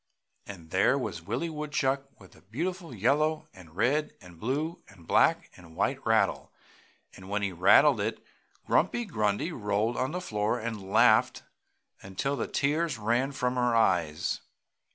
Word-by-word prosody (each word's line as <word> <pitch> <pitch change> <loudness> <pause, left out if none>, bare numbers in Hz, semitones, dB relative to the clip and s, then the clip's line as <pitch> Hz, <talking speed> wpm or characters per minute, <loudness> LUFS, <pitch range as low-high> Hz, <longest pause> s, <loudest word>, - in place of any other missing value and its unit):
And 85 -5 -11
there - - +3
was 80 - -4
Willie 120 - -3
Woodchuck 140 -3 -2
with 95 -3 -16
the - - -20
beautiful 170 - -4
yellow 150 +8 +1
and 85 -4 -16
red 140 +9 +1
and 90 -2 -15
blue 150 - -2
and 95 -4 -17
black - - +2
and 85 -3 -15
white - - -1
rattle, - - +1 0.6
and 95 0 -12
when 100 0 -1
he 100 - -1
rattled 105 - +5
it 110 +2 -3 0.4
Grumpy 240 0 +1
Grundy 105 - -1
rolled 105 -2 -1
on 130 - 0
the 180 - -3
floor 105 -7 -1
and 110 -4 -6
laughed - - +4 0.6
until 100 +9 -3
the - - -3
tears 150 -1 0
ran 120 +5 0
from 125 -2 -1
her 125 -1 +2
eyes. 85 -7 +1
115 Hz, 155 wpm, -28 LUFS, 95-145 Hz, 0.6 s, rattled